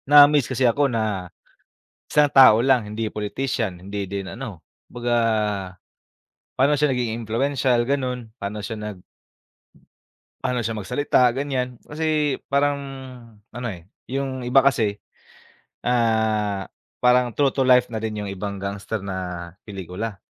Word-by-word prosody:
Na-amaze 145 -2 +7
kasi 130 0 +1
ako 140 +4 +3
na 105 -6 -2 0.8
isang 150 0 +5
tao 130 -5 +9
lang, 130 -3 +4
hindi 110 +1 -2
politician, 105 -2 -2
hindi 100 +2 -5
din 100 -1 -4
ano, 115 -7 -7 0.3
kumbaga 120 0 -1 1.4
pa'no 140 +3 +3
siya 150 -1 +2
naging 120 -2 -2
impluwensyal, 125 +2 +1
ganun. 125 -4 -1
Pa'no 105 0 -5
siya 110 +2 -5
nag 105 -2 -6 1.5
pa'no 125 -3 -1
siya 115 - -1
magsalita, 125 +4 +2
ganyan. 130 -3 -2
Kasi 150 -2 0
parang 140 +1 +2 0.8
ano, 120 +1 -4
eh, 85 -5 -9 0.2
yung 135 0 -2
iba 125 +2 +4
kasi, 110 -7 +2 0.9
ah, 110 -4 +1 0.3
parang 125 -1 +4
true 140 -2 +3
to 135 -1 0
life 125 -1 +5
na 110 - -3
rin 110 0 -3
yung 100 - -4
ibang 100 0 -5
gangster 100 +1 -4
na 90 -3 -5 0.2
pelikula. 100 +1 -6
120 Hz, 130 wpm, -23 LUFS, 105-135 Hz, 1.5 s, tao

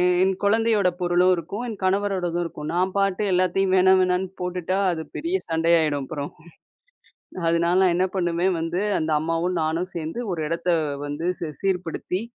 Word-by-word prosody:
எ 180 0 +3
என் 190 0 +3
கொழந்தையோட 215 -1 +3
பொருளும் 180 +1 +3
இருக்கும், 190 +8 -5
என் 215 - -6
கணவரோடதும் 185 -3 0
இருக்கும். 150 -2 -6
நான் 180 +2 +1
பாட்டு 195 0 +1
எல்லாத்தையும் 185 +1 +2
வேணா 185 0 +5
வேணான்னு 185 +1 +1
போட்டுட்டா 180 0 -2
அது 165 -2 -3
பெரிய 340 +4 -1
சண்டையாயிடும் 160 -3 +2
அப்புறம். 145 +1 -5 1.2
அதுனால 170 +2 +2
நான் 185 -2 +4
என்ன 185 +1 +2
பண்ணுவேன் 175 0 +1
வந்து 165 +3 -2 0.2
அந்த 160 0 -2
அம்மாவும் 165 +3 -1
நானு 160 +2 0
சேந்து 165 +6 -4
ஒரு 170 - -3
இடத்த 170 +2 -3 0.4
வந்து 145 +4 -4
சி 165 - -3
சீர்படுத்தி 180 -1 -2
180 Hz, 155 wpm, -24 LUFS, 165-190 Hz, 1.2 s, வேணா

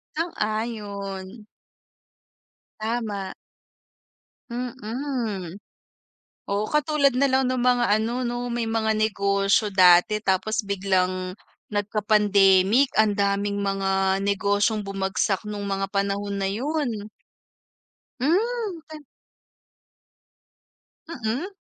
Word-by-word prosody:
Sang-ayon. 210 - -4 1.3
Tama. 215 -4 -3 1.2
Mm. 235 - -4 0.9
Oo, 200 +1 0
katulad 300 -3 +2
na 275 +2 +3
lang 265 0 +2
ng 255 -1 0
mga 245 -1 +3
ano, 230 +3 -2
'no? 240 0 -3
May 235 -1 -2
mga 225 -1 0
negosyo 200 -1 +1
dati. 185 +2 +5
Tapos 205 +2 0
biglang 185 -2 0 0.4
nagka-pandemic. 205 +2 +3
Ang 215 -2 +4
daming 200 0 0
mga 195 -1 +1
negosyong 205 +2 +1
bumagsak 195 0 -1
nung 205 -1 -4
mga 195 0 -1
panahon 200 +1 -2
na 195 -1 -1
yun. 240 -3 -2 1.1
Hmm, 405 - 0
twen 310 -1 -10 2.1
Mm. 250 +2 -3
210 Hz, 85 wpm, -24 LUFS, 195-240 Hz, 2.1 s, dati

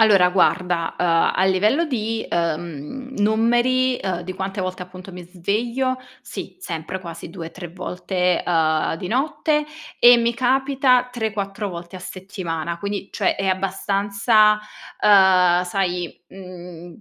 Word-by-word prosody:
Allora 200 -5 +6
guarda, 180 -2 +1
uhm, - - +1 0.3
a 190 - +2
livello 210 - +2
di, 225 -6 -2
ehm, 170 - -3
numeri, 240 +4 +2
uhm, 185 -2 -2
di 185 +2 -5
quante 190 +1 -4
volte 185 0 -4
appunto 185 +1 -11
mi 180 0 -8
sveglio, 235 +8 -1 0.2
sì, - - -8
sempre 165 - -5
quasi 165 -2 -8
2-3 175 0 -8
volte, 180 0 -1
uhm, 160 -3 +1
di 180 - -6
notte 300 +5 0 0.3
e 245 0 +8
mi 235 0 +1
capita 255 0 +2
3-4 215 -3 -3
volte 170 0 -9
a - - -7
settimana. 180 -3 -5
Quindi 200 +1 -4
cioè - - +1
è 195 - -2
abbastanza, 200 +3 +2 0.5
uhm, 185 -3 +5
sai, 180 -2 -2
mhmm, 175 -2 -11
190 Hz, 130 wpm, -22 LUFS, 180-225 Hz, 0.5 s, e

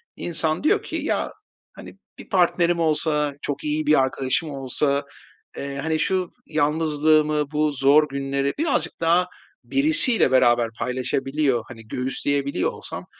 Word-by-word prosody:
insan 160 - -2
diyor - - +2
ki - - -6
"Ya, - - -1 0.4
hani, - - -12 0.2
bir - - -12
partnerim 175 -2 +2
olsa, 150 -2 +1
çok 145 - -4
iyi 150 0 -1
bir 150 -2 +5
arkadaşım 130 +4 -1
olsa, 140 +1 -1 0.5
eee, 140 0 -5
hani, 160 -1 0
şu 185 -2 0 0.2
yalnızlığımı, 155 -1 +1
bu 150 0 +1
zor 140 +3 +4
günleri 140 0 -2
birazcık 275 - -1
daha 175 +2 +3 0.4
birisiyle 275 - +3
beraber 120 -3 +3
paylaşabiliyor, 130 0 -1
hani, 115 -3 -12
göğüsleyebiliyor 140 +3 -1
olsam - - -8
150 Hz, 125 wpm, -23 LUFS, 135-160 Hz, 0.5 s, bir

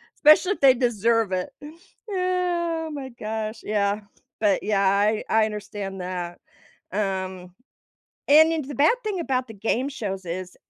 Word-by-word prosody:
Especially 310 +6 +5
if - - -13
they 270 -2 +8
deserve 230 -3 +1
it. 185 -1 -2
Eh, 290 - -9 0.4
oh 355 -3 -1
my 270 -2 -6
gosh, 220 -1 -5
yeah. 205 0 0 0.4
But, 205 -3 +2
yeah, 200 -2 +2
I 205 +2 +2
I 220 0 +4
understand 205 -2 -6
that, 180 -1 -5 0.5
um, 190 -3 -3 0.8
and 315 +2 +7
and 315 - -2
the 285 - -6
bad 300 - +4
thing 415 -4 -2
about 260 -6 -1
the 225 - -10
game 230 +6 -1
shows 195 -8 -5
is, 180 +1 -5
220 Hz, 150 wpm, -24 LUFS, 195-290 Hz, 0.8 s, they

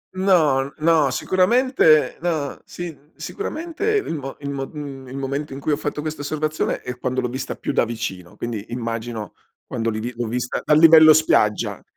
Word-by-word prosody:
No, 155 -8 +3
no, 155 -3 +3
sicuramente 185 - +3
no, 155 -5 -2
sin 160 -4 -9
sicuramente 400 +3 -3
il 400 - -1
mo 135 -3 -6
il 140 - -4
mo 135 -1 -4
mhmm, 140 -4 -8
il 130 +2 -7
momento 140 +1 -3
in 135 - -7
cui 150 - -1
ho - - +3
fatto 150 -1 -3
questa 155 -1 -5
osservazione 155 +1 -2
è 125 -1 -6
quando 130 0 -1
l'ho 125 - -1
vista 130 +2 -4
più - - -4
da - - +3
vicino. 105 -7 -5
Quindi, 115 -4 -4
immagino 115 -2 -4 0.3
quando 115 0 -2
li 110 -1 -3
vi 120 +3 -4
l'ho 120 -1 -3
vista 125 +2 -2
dal 150 - +4
livello 160 -1 +9
spiaggia. 130 -9 +2
140 Hz, 180 wpm, -22 LUFS, 125-160 Hz, 0.3 s, livello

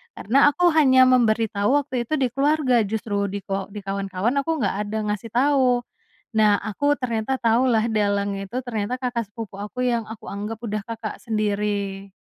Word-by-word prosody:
Karena 270 +8 +3
aku 350 +4 +3
hanya 265 -5 +5
memberitahu 225 -2 +3
waktu 260 -5 -1
itu 310 - 0
di 260 -5 0
keluarga 275 -2 +2
justru, 205 -1 -2
di 200 0 -5
ko 195 0 -3
di 205 0 -9
kawan-kawan 195 +5 -1
aku 310 -1 -1
nggak 195 - 0
ada 215 +1 -3
ngasih 210 +2 -4
tahu. 255 -2 +3 0.5
Nah, 210 -2 +4
aku 285 +8 -1
ternyata 250 +1 -2
tahulah 230 -1 +2
dalang 200 -2 0
itu 195 +5 -4
ternyata 245 -1 -3
kakak 245 -2 -2
sepupu 220 -2 -8
aku 230 +5 -3
yang 235 -2 0
aku 220 0 -10
anggap 210 +3 -5
udah 215 -3 -4
kakak 225 0 -6
sendiri. 205 -3 -2
225 Hz, 165 wpm, -23 LUFS, 205-255 Hz, 0.5 s, hanya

